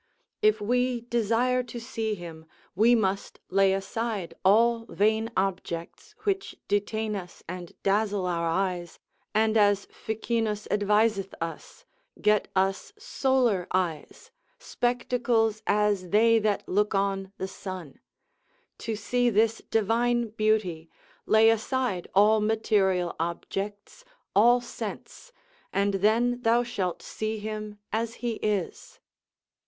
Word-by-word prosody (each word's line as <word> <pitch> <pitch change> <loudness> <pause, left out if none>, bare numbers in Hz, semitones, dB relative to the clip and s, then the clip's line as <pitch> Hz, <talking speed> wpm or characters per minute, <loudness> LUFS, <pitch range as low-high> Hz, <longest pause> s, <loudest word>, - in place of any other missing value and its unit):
If 430 0 +4
we 245 +3 0
desire 240 +2 +1
to 240 -1 -7
see 225 -2 -3
him, 165 -3 -10 0.3
we 225 +6 +5
must 195 -3 -1
lay 195 0 +4
aside 195 0 -3
all 230 +4 +4
vain 220 +2 +1
objects, 180 -3 -3
which 390 -1 -1
detain 210 +1 -1
us 180 -3 -8
and 180 -1 -7
dazzle 200 -1 +1
our 170 -2 -1
eyes, 175 -1 -2 0.4
and 220 0 +3
as 205 -2 +3
Ficinus 220 -1 -2
adviseth 210 -1 +2
us, 165 - -7 0.3
get 210 0 +2
us 195 - 0
solar 255 - +1
eyes, 175 -5 -3 0.3
spectacles 240 - 0
as 205 -3 +1
they 225 +3 +5
that 210 -2 -1
look 210 +2 +1
on 195 -1 -1
the 190 - -3
sun: 185 -6 -8 0.8
to 225 -1 -3
see 245 +4 +1
this 225 +1 +2
divine 235 +2 +1
beauty, 210 -7 0 0.4
lay 220 +1 +6
aside 225 -4 -1
all 210 +2 +5
material 200 -5 +1
objects, 205 - -5 0.3
all 240 +4 +6
sense, 365 - -8 0.4
and 200 +1 +1
then 230 +5 +2
thou 235 +1 +3
shalt 190 -7 -3
see 220 0 -3
him 215 0 -6 0.2
as 230 +1 -1
he 240 - +1
is. 205 -4 -3
210 Hz, 115 wpm, -27 LUFS, 195-230 Hz, 0.8 s, lay